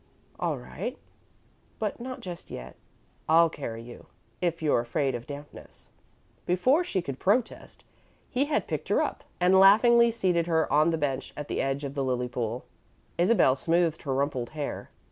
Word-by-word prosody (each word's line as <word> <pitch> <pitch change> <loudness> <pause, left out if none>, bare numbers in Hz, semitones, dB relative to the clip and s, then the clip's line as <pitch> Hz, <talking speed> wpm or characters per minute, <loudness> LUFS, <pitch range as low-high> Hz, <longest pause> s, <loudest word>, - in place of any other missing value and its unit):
"All - - -1
right, - - -6 0.8
but 215 -2 -3
not 255 +1 -6
just 175 -2 -8
yet. - - -8 0.5
I'll 165 0 +5
carry 115 -7 -6
you, 120 0 -12 0.3
if 170 -2 0
you're 150 -6 +2
afraid 130 +3 -1
of 120 +3 -6
dampness." 145 0 -11 0.6
Before 255 - +3
she 190 - -2
could 135 -5 -6
protest, 225 +5 -1 0.4
he 265 +2 0
had 300 0 0
picked - - -4
her - - +3
up - - -4 0.2
and 185 +1 +5
laughingly 235 +4 +7
seated 180 -7 0
her 160 -4 +1
on 155 +3 +5
the 165 - 0
bench 140 -4 -2
at 150 -1 -6
the - - -1
edge 135 +1 -1
of 140 -1 -4
the 140 -1 -1
lily 125 -1 -1
pool. 120 0 -3 0.5
Isabel 175 - +4
smoothed 165 +2 +1
her 135 -3 -2
rumpled 135 -3 -1
hair. 145 - -4
160 Hz, 165 wpm, -27 LUFS, 135-190 Hz, 0.8 s, laughingly